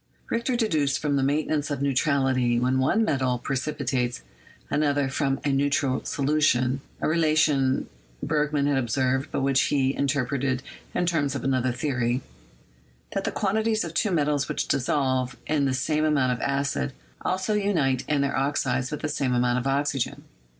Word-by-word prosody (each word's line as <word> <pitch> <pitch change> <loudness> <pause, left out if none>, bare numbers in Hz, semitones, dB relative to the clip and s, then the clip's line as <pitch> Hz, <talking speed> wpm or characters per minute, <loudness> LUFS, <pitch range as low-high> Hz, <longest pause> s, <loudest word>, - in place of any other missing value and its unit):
Richter 235 +2 0
deduced 155 - +1
from 150 -2 -1
the 140 - +2
maintenance 145 +2 0
of 145 -2 -2
neutrality 135 -3 +2
when 130 +2 +1
one 215 +12 +2
metal 130 -7 +1
precipitates 130 - -2 0.4
another 145 -2 +1
from 135 0 0
a - - +2
neutral 140 -1 +1
solu 150 +2 0
tion 125 -1 +2
— - - -29
a - - +1
relation 155 -4 +2 0.4
Bergman 150 -2 +1
had 140 -2 +2
observed, 130 +2 0
but - - -1
which 135 -1 +3
he 135 -2 +2
in 140 - 0
terpreted 135 -1 0 0.3
in 180 - +1
terms 150 -5 0
of - - -4
another 130 -1 +1
theory 125 -1 -1 0.5
— - - -22
that - - -2
the - - 0
quantities 220 +2 0
of 170 -2 -6
two 210 - +1
metals 150 -5 +1
which - - -2
dissolve 130 -1 0
in 150 -2 +1
the 135 - +1
same 155 +4 0
amount 140 -5 +2
of 125 - -5
acid 140 - -1 0.3
also 190 +3 -1
unite 165 -12 +1
in 145 -2 +2
their 140 0 0
oxides 130 -2 0
with 150 - -5
the 155 - -1
same 135 -4 0
amount 120 0 +2
of 125 - -3
oxygen. 140 -1 -1
140 Hz, 170 wpm, -25 LUFS, 130-150 Hz, 0.5 s, which